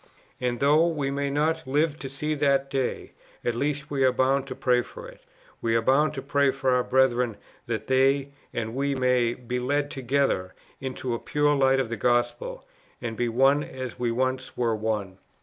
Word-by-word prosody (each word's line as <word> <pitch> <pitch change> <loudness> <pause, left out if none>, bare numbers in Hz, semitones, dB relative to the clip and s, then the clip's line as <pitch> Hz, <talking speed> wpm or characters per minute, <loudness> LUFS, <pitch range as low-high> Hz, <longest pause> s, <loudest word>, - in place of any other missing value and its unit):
And 125 -2 -1
though 150 +4 +4
we 145 -5 -1
may 140 0 -1
not 155 +3 0
live 150 +3 +1
to 135 - -6
see 150 +3 -2
that 140 -2 +1
day, 135 -2 -2 0.3
at 120 - +1
least 145 +4 -2
we 135 -2 +1
are 130 - +5
bound 135 +2 +1
to 130 - -6
pray 125 -1 +2
for - - -10
it; - - -14 0.4
we 115 0 +1
are 115 - +3
bound 150 +5 +3
to 135 - -5
pray 140 0 +2
for 135 -1 0
our 125 0 +3
brethren 125 -4 +2 0.3
that 115 -2 -3
they 135 +1 +2 0.2
and 110 -1 -3
we 140 +2 0
may 125 -2 +2
be 125 0 -4
led 145 +3 0
together 130 -8 0 0.2
into 130 -1 -4
the 115 - -1
pure 145 0 +1
light 135 -1 +3
of 130 -4 -1
the 115 - -3
gospel, 120 - 0 0.3
and 115 -2 -4
be 120 +1 0
one 135 +5 +3
as 130 -1 -7
we 120 -1 0
once 130 +2 -2
were 115 -2 +1
one. 105 -3 -3
130 Hz, 195 wpm, -26 LUFS, 120-140 Hz, 0.4 s, are